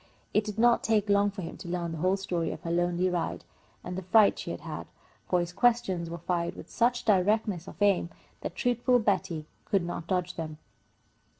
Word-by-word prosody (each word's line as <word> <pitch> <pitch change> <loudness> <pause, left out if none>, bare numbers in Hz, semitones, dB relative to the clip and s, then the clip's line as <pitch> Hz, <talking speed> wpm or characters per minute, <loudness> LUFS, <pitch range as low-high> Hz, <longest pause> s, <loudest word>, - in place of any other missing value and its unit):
It 210 - +3
did 210 -1 -6
not 240 +1 +5
take 215 -2 +2
long 200 0 +4
for 195 -2 -7
him 165 - -7
to - - -9
learn 175 -1 -2
the 165 - -5
whole 185 +4 +2
story 180 -4 -2
of - - -7
her 165 - -3
lonely 175 +1 +1
ride, 180 -2 -2 0.4
and 180 - -5
the 190 - -3
fright 205 +3 +4
she - - -5
had - - -5
had, - - -6 0.4
for 180 - +3
his 175 0 -3
questions 195 -8 +2
were 170 - -5
fired 170 0 -2
with - - -11
such 240 +1 +1
directness 205 -2 +2
of - - -11
aim 195 -4 +3 0.3
that - - -5
truthful 245 0 +2
Betty 190 -8 0 0.2
could 195 -4 +1
not 170 -1 -5
dodge 180 -2 0
them. 155 -2 -5
185 Hz, 205 wpm, -29 LUFS, 175-210 Hz, 0.4 s, not